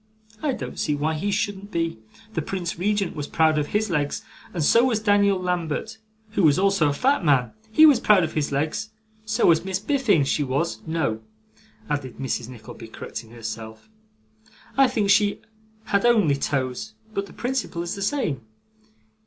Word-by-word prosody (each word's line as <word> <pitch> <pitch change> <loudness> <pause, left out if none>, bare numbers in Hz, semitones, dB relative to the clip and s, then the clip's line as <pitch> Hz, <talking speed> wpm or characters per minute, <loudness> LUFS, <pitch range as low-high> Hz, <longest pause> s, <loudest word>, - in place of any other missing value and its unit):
I 290 -3 0
don't - - -6
see 150 - 0
why 150 +2 0
he 160 +6 -2
shouldn't 205 -1 -2
be. 165 - -2 0.3
The 160 - -1
Prince 175 +1 -4
Regent 200 -1 0
was 145 -2 -4
proud 160 -2 +3
of 145 - -1
his 210 -1 0
legs, 145 -3 -1 0.3
and 170 -4 -2
so 230 +10 +5
was 245 -4 +2
Daniel 205 -2 +3
Lambert, 180 +4 -2 0.3
who 205 - 0
was 150 -5 +5
also 195 -6 +3
a - - +1
fat 270 - +2
man; 130 -7 +3 0.2
HE 310 +8 +7
was 290 -6 +7
proud 210 -5 +5
of 160 - -2
his 150 -2 -1
legs. 155 +9 -1 0.4
So 220 +2 +1
was 165 -1 +5
Miss 190 0 -1
Biffin: 215 - +2
she 145 +2 0
was 140 +5 -1
no,' 155 -9 -1 0.7
added 140 -5 -3
Mrs. 125 -3 -3
Nickleby, 115 -2 -10
correcting, 110 0 -8
herself, 110 - -8 0.9
'I 270 0 +6
think 215 -5 +1
she 205 0 +3 0.4
had 200 -2 +1
only 220 -11 +4
toes, 140 +10 -2 0.2
but 200 -1 -2
the - - -14
principle 245 -9 -2
is 175 - -3
the 200 - -6
same. 200 - -1
175 Hz, 175 wpm, -24 LUFS, 145-210 Hz, 0.9 s, HE